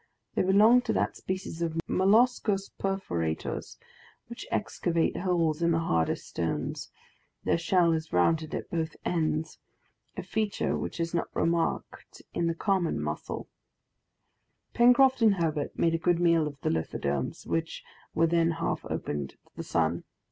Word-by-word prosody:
They - - +1
belong 210 +6 +6
to - - +3
that - - 0
species 185 -3 -5
of 165 -1 -1
molluscous 205 0 +3
perforators 85 - -3 0.5
which - - -9
excavate 165 -1 0
holes 170 -4 0
in 170 - +3
the - - +2
hardest 85 - 0
stone; 85 -1 -2 0.7
their - - +1
shell 170 0 +3
is 160 0 -3
rounded 155 - +2
at - - -6
both 160 -2 -2
ends, 155 -2 -1 0.6
a - - -3
feature 215 -2 -1
which - - -4
is 165 0 -2
not 170 - 0
remarked 165 0 -2
in 170 - 0
the 165 - 0
common 190 -2 0
mussel. 75 0 -4 1.3
Pencroft 250 +2 +5
and 215 -3 +5
Herbert 160 -4 -2
made 165 -1 +2
a 165 - 0
good 175 0 +2
meal 170 -3 +3
of 145 -2 -8
the - - 0
lithodomes, 70 -4 -2
which 165 0 -2 0.3
were 165 - +4
then 165 0 +2
half 165 +1 -2
opened 70 -2 -3
to - - -20 0.2
the - - -5
sun. 85 +1 0
165 Hz, 150 wpm, -28 LUFS, 155-190 Hz, 1.3 s, belong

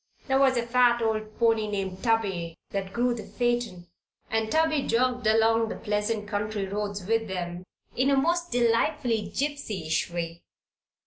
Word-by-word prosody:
There 265 -1 +2
was 265 -2 +4
a 235 - 0
fat 240 0 +4
old 215 -1 -2
pony 225 -2 +2
named 195 -2 -3
Tubby 195 -8 0 0.2
that 195 -1 -3
drew 245 +2 +1
the 235 - -5
phaeton, 240 -7 -2 0.5
and 220 0 0
Tubby 315 -2 +2
jogged 245 -1 +1
along 225 +1 +3
the - - -4
pleasant 210 0 -2
country 210 -1 -2
roads 200 -1 -3
with 225 +2 +1
them 175 -2 -4 0.3
in 260 +2 +2
a 275 - +3
most 345 +5 +1
delightfully 235 -1 +1
gypsyish 215 - -2
way. 170 -1 -4
225 Hz, 150 wpm, -27 LUFS, 205-245 Hz, 0.5 s, was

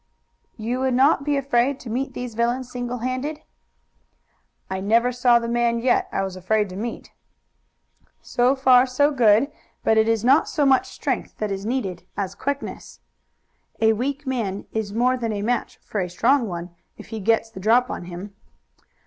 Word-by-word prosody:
"You 235 +3 -2
would 260 -1 +1
not 275 +2 +4
be 290 0 0
afraid 270 0 +1
to 235 - -8
meet 260 +4 -3
these 250 -2 -5
villains 240 +3 -1
single 245 0 -4
handed?" 280 +4 -3 1.3
"I 190 - -3
never 230 +5 +2
saw 245 -1 +4
the 235 0 -2
man 235 0 +1
yet 245 +2 +1
I 195 - -1
was 190 -1 -4
afraid 205 +3 0
to 180 - -8
meet." 225 +4 -6 1.1
"So 250 +3 +1
far, 260 -1 +5
so 285 +4 +2
good, 240 +1 +4 0.3
but 220 0 +4
it 220 +1 +3
is 225 0 +1
not 275 +5 +4
so 295 -3 +1
much 265 -1 +4
strength - - -3
that 215 -1 -2
is 195 +1 -4
needed 205 -8 -2 0.2
as 195 -2 -2
quickness. 280 +7 -5 0.8
A 220 0 +4
weak 275 +6 -3
man 225 -7 -2
is 220 -2 -3
more 250 +4 +2
than 230 -3 -2
a 205 -1 -3
match 245 +2 -1
for 210 - -3
a 180 - -3
strong 235 +7 +2
one 175 -1 -6 0.3
if - - -12
he 220 -1 -5
gets 225 +2 +1
the 190 - -9
drop 235 +6 +3
on - - -5
him." 180 +3 -8
235 Hz, 180 wpm, -23 LUFS, 210-255 Hz, 1.3 s, far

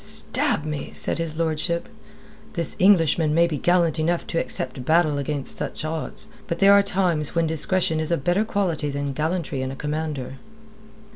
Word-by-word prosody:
"Stab 150 - +2
me!" 150 -2 -4
said - - +2
his 160 -2 -3
lordship. 165 +1 0 0.7
"This 170 -4 -2
Englishman 165 -5 +4
may 170 +1 +5
be 155 -4 -3
gallant 170 -1 +2
enough 170 +2 0
to 165 - -2
accept 130 - -3
battle 155 0 +2
against 140 -1 -2
such - - -4
odds. 160 0 -2 0.2
But 170 - -2
there 195 +3 +6
are 200 - +7
times 180 -7 0
when 165 0 +2
discretion 160 +1 +1
is 155 - -3
a 170 - +1
better 175 +9 +1
quality 180 -8 -1
than 140 0 -3
gallantry 155 -2 -2
in 130 - -3
a 135 - -6
commander." 150 -3 -4
160 Hz, 170 wpm, -23 LUFS, 150-175 Hz, 0.7 s, are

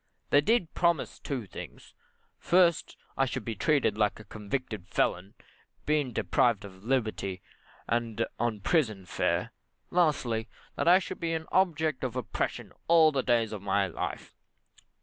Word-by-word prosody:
They 145 - +6
did 200 0 +1
promise 170 -4 0
two 130 -6 -4
things. - - -10 0.5
First, 175 -2 +3 0.2
that - - -1
I - - +5
should 130 - -4
be 115 - -2
treated 110 -2 +1
like 105 0 +1
a - - -10
convicted 110 -1 -5
felon, 90 +3 -1 0.5
being 150 -4 +1
deprived 110 +1 +1
of 95 -1 -13
liberty, 110 -7 -1 0.4
and 115 -1 0
on 115 -3 -1
prison 110 - +1
fare. - - -1 0.4
Lastly, 130 -10 +1 0.3
that - - -1
I 180 +2 +8
should 190 - -5
be 165 -1 -1
an 160 0 -3
object 160 -7 +1
of 125 -2 -2
oppression 125 -3 -3
all 165 -2 +6
the 135 -3 0
days 115 -3 +1
of 105 - -5
my 100 0 +1
life. 90 - -5
120 Hz, 150 wpm, -29 LUFS, 105-155 Hz, 0.5 s, I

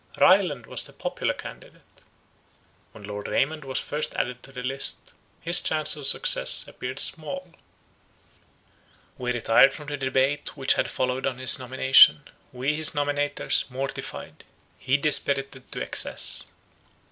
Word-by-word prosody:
Ryland 180 - +3
was - - -3
the - - -13
popular - - -4
candidate; - - -14 0.9
when 105 - -15
Lord 105 0 -7
Raymond 150 +2 -1
was 135 -1 -5
first 150 +1 -5
added 125 0 -3
to 135 - -15
the 125 -1 -8
list, 135 +2 -2 0.3
his 170 +2 +2
chance 155 -1 +1
of 145 -2 0
success - - +4
appeared 130 +2 -8
small. 175 +4 -3 1.7
We 125 -1 -2
retired 120 +3 +3
from 150 -2 -10
the 145 - -4
debate 135 +3 -1
which 135 -1 +2
had - - -2
followed 130 +1 -2
on 130 -2 -4
his 130 0 +5
nomination: 130 - +5 0.3
we, 135 +4 -2
his 155 0 +3
nominators, 145 -1 -1
mortified; 135 +2 -7 0.4
he 130 +1 0
dispirited 140 -2 +1
to - - -6
excess. - - +1
135 Hz, 135 wpm, -24 LUFS, 130-145 Hz, 1.7 s, his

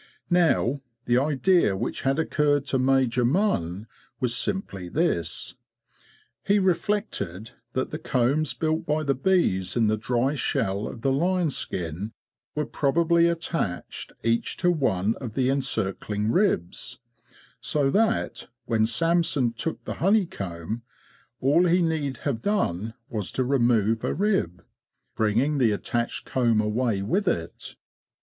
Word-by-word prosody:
Now, 160 -6 +3 0.2
the 120 +1 +3
idea 145 - +2
which - - -3
had 135 +1 +1
occurred 150 -3 +1
to 135 -2 0
Major 130 -2 +2
Munn 120 - 0 0.3
was 125 -2 0
simply 100 - -2
this: 140 - -1 0.9
He 200 +1 +3
reflected 170 - -1 0.2
that 130 - -2
the 155 - -4
combs 135 +1 +1
built 160 0 0
by 155 +1 0
the 140 -2 +2
bees 135 - +1
in 115 - +3
the 110 0 +2
dry 125 +4 0
shell 100 -7 -1
of 115 - -8
the 135 - +1
lion 175 +3 +1
skin 90 - -3 0.4
were 150 0 0
probably 170 +4 +2
attached 165 - -3
each 115 +1 0
to 175 -1 +3
one 110 - +1
of 120 -5 -7
the 130 0 +2
encircling 110 -5 -1
ribs; 175 - 0 0.6
so 140 -2 0
that, 225 +5 0 0.2
when 110 -2 +2
Samson 155 -1 +1
took 120 +8 -4
the - - -3
honey 200 +3 +4
comb, 95 - -5 0.6
all 155 +7 +4
he 175 +1 +3
need 150 -5 -1
have 130 -6 -1
done 115 - -1
was 105 -4 -4
to 130 - +1
remove 120 -4 +2
a - - -1
rib, 175 - 0 0.5
bring 110 -1 +1
ing 140 +3 +2
the 120 -3 +4
attached 115 +3 -2
comb 120 -4 +2
away 110 -1 0
with 195 - 0
it. 85 - -3
130 Hz, 140 wpm, -25 LUFS, 110-165 Hz, 0.9 s, honey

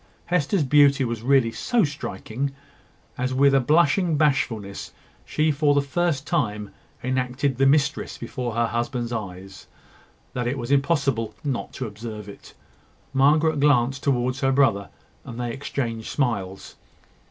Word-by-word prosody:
Hester's 175 0 +1
beauty 140 -1 +4
was 115 -2 -3
really 130 -2 +3
so 235 - +1
striking, 135 - -4 0.6
as 130 +1 -1
with 140 +1 +4
a 135 - +5
blushing 155 +4 +3
bashfulness, 135 -9 -1 0.3
she 155 +1 +1
for 145 0 +2
the 145 - +4
first 145 0 -1
time 105 - -1 0.3
enacted 130 +1 -1
the 135 - +5
mistress 145 +1 +1
before 120 -3 -5
her 120 0 +2
husband's 120 +1 -2
eyes, 95 -4 -7 0.7
that 125 -2 -2
it 130 +3 -1
was 120 0 -4
impossible 135 -7 +1
not 135 -4 -3
to 130 - -4
observe 105 -1 -7
it. 100 - -13 0.6
Margaret 150 +3 +3
glanced 135 -2 +3
towards 130 -1 0
her 135 -2 +2
brother, 130 -8 +2 0.3
and 120 -1 -8
they 120 -1 -2
exchanged 115 -4 -4
smiles. 100 -9 -3
135 Hz, 140 wpm, -24 LUFS, 115-145 Hz, 0.7 s, a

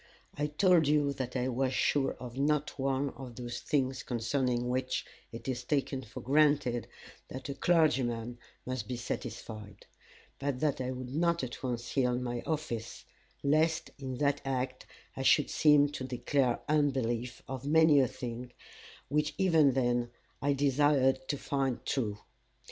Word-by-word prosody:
I 145 +1 0
told 165 +1 +4
you 145 -1 +3
that 130 -2 -5
I 125 0 0
was 130 +1 0
sure 140 +1 +2
of 125 -1 -9
not 150 +1 0
one 135 +1 0
of 125 -3 -10
those 120 -1 -5
things 130 -2 0
concerning 125 0 -1
which 130 +1 -1 0.3
it 115 +2 -8
is 125 -2 -2
taken 135 0 -1
for 115 -2 -9
granted 145 -3 +2 0.4
that 130 +2 -7
a - - -2
clergyman 125 -8 +1 0.3
must 130 -4 -3
be 125 - -3
satisfied; 110 -3 -6 0.5
but 140 -2 -2
that 145 -3 0
I 130 - -2
would 130 0 -5
not 170 +1 +1
at 120 -2 -5
once 120 -2 -4
yield 125 -2 +2
my 120 -1 -3
office, 120 -8 -3 0.4
lest 160 +3 +2
in 130 -2 -5
that 145 0 +1
act 130 -1 -3 0.3
I - - -4
should 145 +2 +4
seem 150 -2 +5
to 145 -2 -6
declare 130 0 0
unbelief 130 -5 0
of 130 -1 -5
many 160 -1 +6
a 130 - +4
thing 120 0 -6 0.5
which 150 +2 0
even 160 -8 +4
then 120 -2 +1 0.3
I 145 +1 +2
desired 135 -1 +2
to 145 - -1
find 135 -3 -2
true. 110 -7 -1
130 Hz, 155 wpm, -31 LUFS, 125-145 Hz, 0.5 s, many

